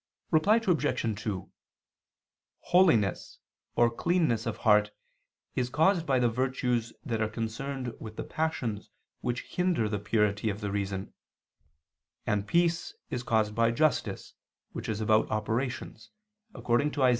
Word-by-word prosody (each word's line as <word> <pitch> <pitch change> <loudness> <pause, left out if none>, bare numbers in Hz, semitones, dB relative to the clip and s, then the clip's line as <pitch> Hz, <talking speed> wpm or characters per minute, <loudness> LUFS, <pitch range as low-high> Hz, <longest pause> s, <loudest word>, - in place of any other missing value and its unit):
Reply 175 +7 +5
Obj. 145 - 0
2: 100 -4 -4 1.1
Holiness 160 - +3 0.4
or 120 -1 +4
cleanness 125 -5 +1
of 115 - -2
heart 105 -1 +4 0.6
is 125 -1 -1
caused 165 +5 +2
by 135 -2 +3
the 125 -1 +3
virtues 125 -1 0
that 115 -2 -1
are 110 - +1
concerned 120 +3 -4
with 110 -1 -8
the - - -4
passions 130 -10 -2 0.3
which 120 0 -2
hinder 180 -11 0
the 105 -1 -2
purity 105 0 +1
of 100 0 -3
the 100 -2 -3
reason; 100 -1 -3 1.1
and 105 -1 0
peace 170 +2 +1 0.2
is 125 - -2
caused 110 -3 +1
by 115 +1 +3
justice 155 +6 0 0.4
which - - -6
is 110 -1 -2
about 110 0 +3
operations, 110 +1 -3 0.5
according 120 +5 +1
to 140 -3 +2
Isa. - - +6
115 Hz, 135 wpm, -29 LUFS, 110-140 Hz, 1.1 s, Isa